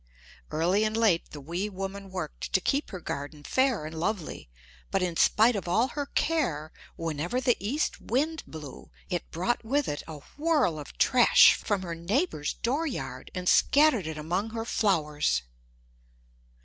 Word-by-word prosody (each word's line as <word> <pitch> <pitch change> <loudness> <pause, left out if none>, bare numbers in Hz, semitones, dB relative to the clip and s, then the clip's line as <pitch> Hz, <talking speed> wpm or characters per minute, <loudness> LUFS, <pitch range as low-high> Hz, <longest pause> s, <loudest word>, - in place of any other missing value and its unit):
Early 175 +7 +2
and 215 0 0
late 210 -7 +2
the 150 - -9
wee 170 +8 -3
woman 195 0 -6
worked 180 -5 -5
to - - +5
keep 280 +9 0
her 185 - -6
garden 145 -1 -6
fair 260 - +1
and 155 - -6
lovely 170 - -3 0.4
but 195 - 0
in 175 -2 -1
spite 225 +7 +4
of 195 - -4
all 225 +9 +2
her 290 -1 -4
care 170 - 0 0.2
whenever 165 - -2
the 255 -2 +3
east 265 +10 -2
wind 305 +7 0
blew 150 -4 -10 0.2
it 175 - -2
brought 185 +10 -1
with 280 +5 0
it 145 - -3
a 155 -3 -8 0.2
whirl 290 - +2
of 145 - -10
trash 250 -2 +7
from 200 -3 -2
her 170 -2 -4
neighbor's 170 - -1
dooryard, 280 +4 -2
and 180 0 -4
scattered 280 - +4
it 160 -1 -5
among 175 +8 -2
her 225 0 -4
flowers. 150 - +1
195 Hz, 160 wpm, -28 LUFS, 160-245 Hz, 0.4 s, trash